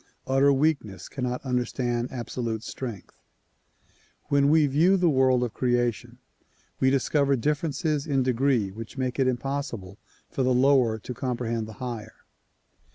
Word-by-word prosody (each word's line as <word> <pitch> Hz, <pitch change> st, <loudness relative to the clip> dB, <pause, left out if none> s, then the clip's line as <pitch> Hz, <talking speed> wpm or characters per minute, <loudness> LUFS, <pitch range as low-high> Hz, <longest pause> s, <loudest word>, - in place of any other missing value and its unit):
Utter 135 Hz, +1 st, +4 dB
weak 145 Hz, +2 st, +2 dB
ness 100 Hz, -3 st, -10 dB
cannot 125 Hz, 0 st, -4 dB
understand 125 Hz, -1 st, -1 dB
absolute 120 Hz, -3 st, -4 dB
strength. 115 Hz, -5 st, -7 dB, 1.1 s
When 140 Hz, 0 st, +3 dB
we 155 Hz, 0 st, +5 dB
view 160 Hz, +8 st, +3 dB
the 175 Hz, -3 st, +3 dB
world 130 Hz, -2 st, +3 dB
of 120 Hz, -, -3 dB
creation 120 Hz, -3 st, -1 dB, 0.6 s
we 130 Hz, -, +4 dB
discover 140 Hz, +1 st, +2 dB
differences 150 Hz, +2 st, -1 dB
in 135 Hz, -3 st, +1 dB
degree 125 Hz, -4 st, +1 dB
which 115 Hz, +5 st, -9 dB
make 130 Hz, 0 st, -2 dB
it 130 Hz, -, +3 dB
impossible 120 Hz, -6 st, -3 dB, 0.3 s
for -, -, -3 dB
the 130 Hz, -1 st, +2 dB
lower 125 Hz, -4 st, +4 dB
to 120 Hz, +4 st, -7 dB
comprehend 120 Hz, -3 st, -3 dB
the 110 Hz, -, -9 dB
higher. 115 Hz, -2 st, -6 dB
130 Hz, 140 wpm, -26 LUFS, 120-140 Hz, 1.1 s, we